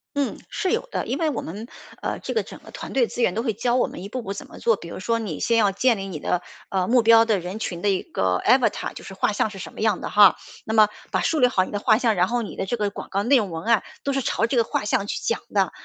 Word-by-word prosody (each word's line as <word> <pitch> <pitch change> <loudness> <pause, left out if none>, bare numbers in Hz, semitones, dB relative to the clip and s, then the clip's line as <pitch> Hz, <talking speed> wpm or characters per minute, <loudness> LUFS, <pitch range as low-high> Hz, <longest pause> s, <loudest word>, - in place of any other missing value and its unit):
嗯， 285 -1 -1
是 380 -3 -2
有 470 +3 -1
的， - - -2
因 - - -1
为 330 - 0
我 270 - -3
们， 205 +8 -7 0.3
呃， - - -3
这 - - -5
个 450 - +2
整 - - -11
个 - - -15
团 - - -8
队 255 -3 +3
资 245 - -2
源 180 - +2
都 225 - -1
会 235 -1 0
教 240 +4 0
我 255 - +2
们 - - -9
一 200 - -7
步 255 +3 -4
步 195 - -6
怎 200 - -6
么 - - -13
做。 230 - +3
比 170 - -11
如 170 - -7
说 230 +5 0
你 205 -10 -4
先 230 - +2
要 210 -3 +4
建 230 +4 +2
立 195 0 -5
你 175 -6 -6
的， 180 +4 -1 0.3
呃， 185 -2 0
目 245 0 +4
标 225 0 +6
的 215 -3 +1
人 180 +4 -6
群 175 -6 -4
的 205 - +2
一 190 -2 0
个 90 -1 0
avatar， 250 +1 +2
就 - - -10
是 195 - -9
画 195 - +1
像 210 - +1
是 205 - -10
什 190 - -8
么 - - -12
样 215 -4 +1
的 - - -5
哈。 205 -3 +7 0.3
那 220 - -3
么 215 -1 +7 0.2
把 - - 0
树 320 - +1
立 250 - +6
好 190 -7 +2
你 - - -10
的 205 - -2
画 215 0 +4
像， 235 -2 +2
然 180 -2 +2
后 240 +2 -1
你 210 - -7
的 195 - -3
这 240 - -1
个 205 -2 -1
广 - - -8
告 200 +1 -1
内 265 +5 +5
容 210 -5 0
文 165 -1 -6
案 230 -2 +4 0.2
都 280 - -1
是 270 - 0
朝 225 -1 0
这 235 - -2
个 235 - +4
画 215 - -2
像 205 -1 0
去 - - -2
讲 - - -1
的。 - - +2
215 Hz, 360 characters per minute, -23 LUFS, 195-240 Hz, 0.3 s, 哈